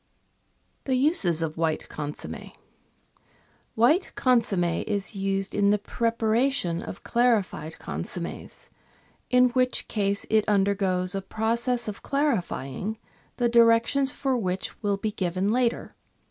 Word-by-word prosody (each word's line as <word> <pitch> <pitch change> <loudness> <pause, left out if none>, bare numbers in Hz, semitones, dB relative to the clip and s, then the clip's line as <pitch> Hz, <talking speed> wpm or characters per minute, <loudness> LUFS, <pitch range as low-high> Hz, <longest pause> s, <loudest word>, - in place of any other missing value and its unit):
The 265 - +1
Uses 235 - +2
of 160 0 -4
White 160 -2 -1
Consomme., 150 0 -7 1.2
White 300 - +3
consomme 230 -8 +2 0.2
is 205 0 -2
used 195 0 -2
in 200 0 +3
the 210 - +4
preparation 230 -3 0
of 185 - -8
clarified 210 -10 0
con - - -5
sommes, - - -7 0.6
in 250 0 +5
which 255 +1 0
case 200 -2 -1
it 220 -1 +4
undergoes 195 -3 +2
a 195 - -2
process 230 +4 -1
of 210 - -6
clarifying, 220 - -2 0.4
the 245 - +2
directions 235 +4 +4
for 270 -2 -1
which 185 -5 -3
will 205 -2 0
be 215 +2 -2
given 185 +1 -1
later. 240 0 0
215 Hz, 120 wpm, -26 LUFS, 190-245 Hz, 1.2 s, in